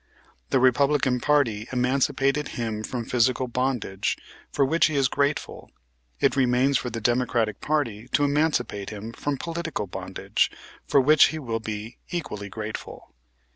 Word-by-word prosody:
The 135 - +3
Republican 130 0 +3
party 120 -8 +2
emancipated 135 +3 +1
him 110 -3 -2
from 120 0 -4
physical 125 +2 +1
bondage, 125 -6 -1 0.3
for 140 - +2
which 165 +5 +3
he 155 - -3
is 135 -2 +3
grateful. 140 +3 -2 0.5
It 130 - +3
remains 130 +1 +3
for 125 - -4
the 115 -1 -4
Democratic 115 -2 +1
party 125 -8 -1
to 145 - +3
emancipate 145 -8 0
him 110 +2 -7
from 145 +3 -2
political 165 -7 -3
bondage, 95 0 -1 0.4
for 140 - +4
which 150 +3 +6
he 160 - -2
will 115 -7 -3
be 110 +1 -6
equally 105 -12 -4
grateful. 110 - -7
125 Hz, 140 wpm, -25 LUFS, 110-140 Hz, 0.5 s, which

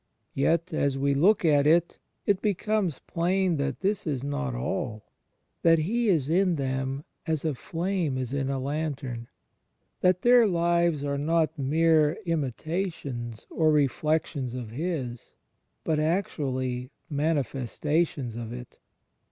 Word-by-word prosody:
Yet 165 +5 +1
as 140 -3 +1
we 140 +1 +2
look 185 +7 +4
at 145 -2 +4
it, 170 +2 +3 0.3
it 200 -1 +2
becomes 205 - 0
plain 180 0 0
that 140 -2 -2
this 195 -1 0
is 135 -4 -1
not 70 - -2
all; 105 - -3 0.6
that 165 -1 +5
He 220 +9 +1
is 155 -8 +2
in 180 +2 +3
them 135 0 -2 0.2
as 160 -1 -1
a 155 - +1
flame 165 0 -2
is 130 0 -3
in 135 -1 -1
a 135 - -1
lantern; 135 -4 -3 0.7
that 185 0 +2
their 240 -2 +6
lives 170 -4 +2
are 140 -1 -1
not 160 +1 +1
mere 155 +2 +3
imitations 145 - -3
or 155 -1 +3
reflections 145 -2 0
of 120 -4 -6
His, 130 -4 -4 0.5
but 155 -2 +1
actually 130 -7 -1 0.2
manifestations 145 -2 -1
of 115 -1 -5
it. 125 0 -9
150 Hz, 130 wpm, -27 LUFS, 135-170 Hz, 0.7 s, their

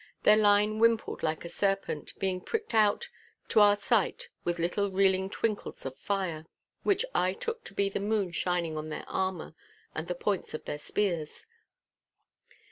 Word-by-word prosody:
Their 210 - +7
line 210 0 +4
wimpled 230 0 +2
like 160 +1 -1
a - - -3
serpent, 195 -3 -2
being 185 -1 -1
pricked 435 - -2
out 210 -2 +3 0.4
to 225 - +4
our 205 -1 +7
sight 210 -1 0
with 175 0 -1
little 180 +4 0
reeling 190 0 +2
twinkles 215 -6 -3
of 135 -1 -4
fire, 170 -3 -2 0.3
which 405 +4 +2
I 185 +1 +2
took 460 - -4
to 195 - -9
be 200 - +2
the 195 - -2
moon 205 -2 0
shining 170 -2 -1
on 155 0 -6
their 155 - -5
armour 185 -4 -2 0.4
and 160 +1 -4
the 180 - -2
points 190 -2 -1
of - - -7
their 145 - -4
spears. 170 -2 -2
195 Hz, 165 wpm, -29 LUFS, 170-210 Hz, 0.4 s, Their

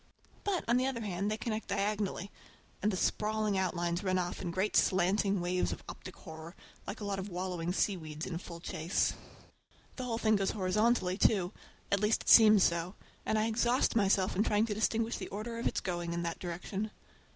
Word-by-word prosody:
But, 390 -4 -1
on 235 +1 +4
the 255 +1 +2
other 255 -3 -2
hand, 200 -1 -2
they 215 - -1
connect 220 -1 -3
diagonally, 200 -1 -1 0.5
and 210 - +2
the 185 - -2
sprawling 215 +1 0
outlines 175 -1 -1
run 185 -1 +1
off 180 0 -2
in 175 - -3
great 190 +4 -1
slanting 195 +2 +3
waves 180 +1 0
of - - -6
optic - - -9
horror, 160 0 -10 0.3
like 200 +3 -5
a - - -3
lot 200 -1 -2
of 190 +2 -5
wallowing 180 -1 -3
seaweeds 160 -6 -1
in 165 -2 -4
full 170 -2 -9
chase. 170 +1 0 0.8
The 255 - -3
whole 235 -2 -2
thing 220 -2 +3
goes 195 -1 0
horizontally, 200 -1 +1
too, 190 -2 +3 0.4
at 200 - +3
least 210 +2 +2
it - - -2
seems 215 -3 +8
so, 170 +3 0 0.3
and 215 - +2
I 215 - +2
exhaust 240 +3 +2
myself 195 -3 +2
in 195 - +2
trying 210 0 +2
to 220 - -2
distinguish 225 +2 0
the - - -5
order 230 +3 -5
of 235 - -1
its - - -1
going 175 -2 -3
in 170 0 -2
that 170 -1 -3
direction. 190 +4 -4
195 Hz, 195 wpm, -32 LUFS, 180-215 Hz, 0.8 s, seems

